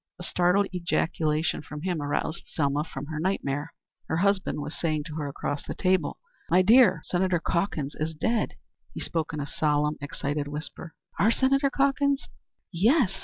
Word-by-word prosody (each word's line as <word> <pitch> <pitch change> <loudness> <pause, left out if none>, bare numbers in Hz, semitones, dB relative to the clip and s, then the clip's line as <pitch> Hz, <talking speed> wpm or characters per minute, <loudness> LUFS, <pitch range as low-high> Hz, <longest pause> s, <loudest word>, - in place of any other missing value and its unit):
A - - -6
startled 180 +3 +3
ejaculation 165 -3 0
from 150 0 -8
him 180 -4 -1
aroused 145 +3 -2
Selma 145 -1 0
from 140 -3 -7
her 155 0 -5
nightmare. 155 -4 -1 0.4
Her - - 0
husband 195 -2 +1
was 150 +1 -4
saying 155 -3 0
to 150 - -8
her 150 -2 -2
across 140 +1 -3
the - - -6
table: 185 0 +1 0.3
"My 180 +2 +5
dear, 205 -5 +6
Senator 180 -1 +1
Calkins 170 -5 -1
is 160 +1 -3
dead." 225 +7 0 0.4
He - - -4
spoke 160 -2 -2
in 150 - -4
a 145 - -2
solemn, 150 0 +1
excited 145 0 -3
whisper. 150 +2 -7 0.2
"Our 210 - +5
Senator 275 +3 +3
Calkins?" 280 0 +1 0.4
"Yes. 200 - +3
165 Hz, 165 wpm, -27 LUFS, 150-190 Hz, 0.4 s, dear